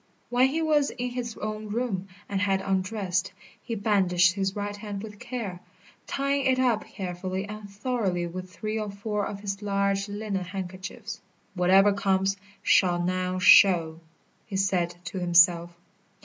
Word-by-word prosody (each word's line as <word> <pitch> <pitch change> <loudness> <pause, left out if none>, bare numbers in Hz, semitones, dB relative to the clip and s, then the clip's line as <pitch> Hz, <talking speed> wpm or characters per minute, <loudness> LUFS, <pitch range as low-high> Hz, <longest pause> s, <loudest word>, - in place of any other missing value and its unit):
When 250 +2 +5
he 320 +4 -1
was 300 -3 +3
in 250 0 -4
his 245 -2 -5
own 215 0 -5
room 205 -4 -2 0.2
and 200 -1 -2
had 195 -1 +2
undressed, 190 0 -1 0.3
he 230 - -4
bandaged 185 -3 +3
his 195 0 -2
right 205 0 -3
hand 205 -1 -6
with 210 -2 -9
care, 225 -8 -5 0.5
tying 275 0 0
it 260 -1 +3
up 245 -4 +1
carefully 185 0 -4
and 210 0 -8
thoroughly 200 -4 -1
with 185 +2 -7
three 215 +2 -3
or 210 -1 -3
four 205 +1 -3
of 200 -1 -7
his 195 0 -4
large 200 0 0
linen 205 -2 -3
handkerchiefs. 190 +5 -7 0.3
"Whatever 190 +2 +5
comes, 195 0 +1 0.3
shall 175 -2 +4
now 185 +1 -1
show," 175 -4 +6 0.5
he 200 - -6
said 180 -3 +1
to 185 +1 -5
himself. 175 -1 +4
200 Hz, 150 wpm, -27 LUFS, 185-215 Hz, 0.5 s, show